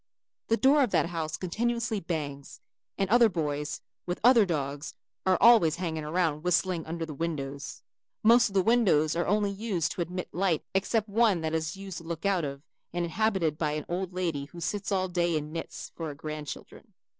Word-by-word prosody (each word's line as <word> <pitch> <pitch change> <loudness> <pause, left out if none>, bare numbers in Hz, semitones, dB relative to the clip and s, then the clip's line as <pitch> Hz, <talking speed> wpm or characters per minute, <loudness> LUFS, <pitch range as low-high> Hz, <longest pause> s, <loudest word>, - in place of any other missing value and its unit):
The 225 - +2
door 280 +4 +5
of 255 - +3
that 170 - +1
house 160 -2 -3
continuously 230 +4 -1
bangs, 145 -5 -5 0.4
and 195 - +1
other 235 -1 +6
boys 150 -4 -3 0.3
with 175 - -2
other 235 -4 +6
dogs 145 -2 -3 0.3
are 185 -1 +4
always 220 -10 +6
hanging 165 -3 -3
around 155 -1 0
whistling 180 -1 +1
under 165 0 -3
the 155 - -7
windows. 140 -3 -4 0.4
Most 230 +1 +6
of 200 - -12
the 190 - +4
windows 185 -10 +3
are 170 - 0
only 205 0 +2
used 200 -5 -1
to - - -4
admit 180 +2 -4
light 180 -3 +1
except 205 +3 +1
one 210 -4 +3
that 160 0 -2
is 160 +2 -2
used 195 -3 -7
to - - -13
look 165 +2 -5
out 195 -4 +2
of 140 -1 -5 0.3
and 175 0 -1
is - - -5
inhabited 190 -6 0
by 150 -2 0
an 150 0 -3
old 180 +1 -3
lady 170 -6 -2
who 170 +4 -12
sits 200 +4 -3
all 190 -1 +1
day 175 -2 +1
and 150 +1 -5
knits 165 - -6
for 165 - -4
her 145 - -6
grandchildren. 150 -2 -8
175 Hz, 195 wpm, -28 LUFS, 155-200 Hz, 0.4 s, other